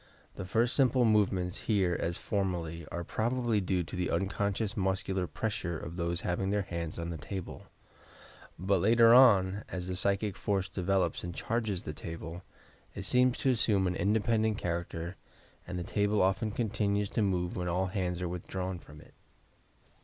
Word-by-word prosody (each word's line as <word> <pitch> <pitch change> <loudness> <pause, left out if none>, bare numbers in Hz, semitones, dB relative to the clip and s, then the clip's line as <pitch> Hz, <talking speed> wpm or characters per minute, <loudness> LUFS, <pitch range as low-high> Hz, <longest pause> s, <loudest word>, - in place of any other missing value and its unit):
The 100 - -5
first 115 +6 +1
simple 130 -2 +4
movements, 95 -5 +2
here 95 -5 +3
as 85 0 -1
formerly, 85 -5 -2
are 85 - -3
prob 110 +7 -1
ably 120 -4 +1
due 90 -1 0
to 85 - -8
the 90 -1 -1
unconscious 100 +2 -1
nmseular 95 -2 -1
pressures 85 -7 -3
of 85 - -7
those 85 -1 -1
having 90 +2 -1
their 100 0 +1
hands 85 -3 -4
on 85 0 -4
the 80 - -5
table; 95 +4 -7 0.9
but 95 +1 +1
later 115 +3 +6
on, 105 -6 +6
as 90 -1 -4
the 90 - -2
psychic 100 +2 0
force 95 -2 -1
develops 95 -2 0
and 85 -1 -5
charges 110 -5 -2
the 75 - -5
table, 80 +2 -7 0.5
it - - -5
seems 125 0 +3
to 135 - +2
assume 105 -5 +2
an 90 0 0
independent 110 +1 +1
character 85 +1 -3 0.5
and 90 0 -4
the 90 - -2
table 105 +1 +1
often 95 +4 +1
continues 105 -2 0
to - - -1
move 90 -3 0
when 90 -1 -2
all 90 +2 0
bands 90 -3 -1
are - - -1
withdrawn 90 +1 -4
from 75 -2 -14
it. - - -18
95 Hz, 170 wpm, -31 LUFS, 90-105 Hz, 0.9 s, later